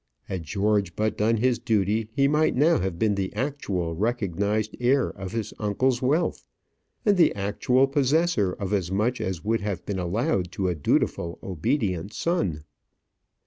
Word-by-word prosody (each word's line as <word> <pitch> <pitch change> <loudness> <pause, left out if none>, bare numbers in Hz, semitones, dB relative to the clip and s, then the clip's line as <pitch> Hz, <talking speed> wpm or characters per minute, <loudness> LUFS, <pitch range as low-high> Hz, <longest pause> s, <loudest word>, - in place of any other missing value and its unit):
Had 90 -4 -5
George 100 +1 0
but 110 -1 0
done 115 +2 +2
his 120 +1 +1
duty, 110 0 0
he 140 +4 +2
might 150 +2 +2
now 150 +3 +4
have 95 -2 -2
been 105 +2 +2
the 95 -1 -2
actual 100 - -2
recognized 105 +1 -1
heir 130 +2 +2
of 95 -1 -7
his 115 -2 -3
uncle's 120 +4 +1
wealth, 145 +7 +1 0.6
and 205 -2 +4
the 170 - +4
actual 125 +7 +2
possessor 140 - +1
of 100 0 -4
as 95 -3 0
much 110 +6 0
as 95 -1 -4
would 115 0 +1
have 100 -4 -4
been 100 -2 -3
allowed 90 0 0
to 95 -1 -1
a - - +1
dutiful, 85 +2 0
obedient 95 - -1
son. 95 - -1
105 Hz, 160 wpm, -25 LUFS, 95-125 Hz, 0.6 s, now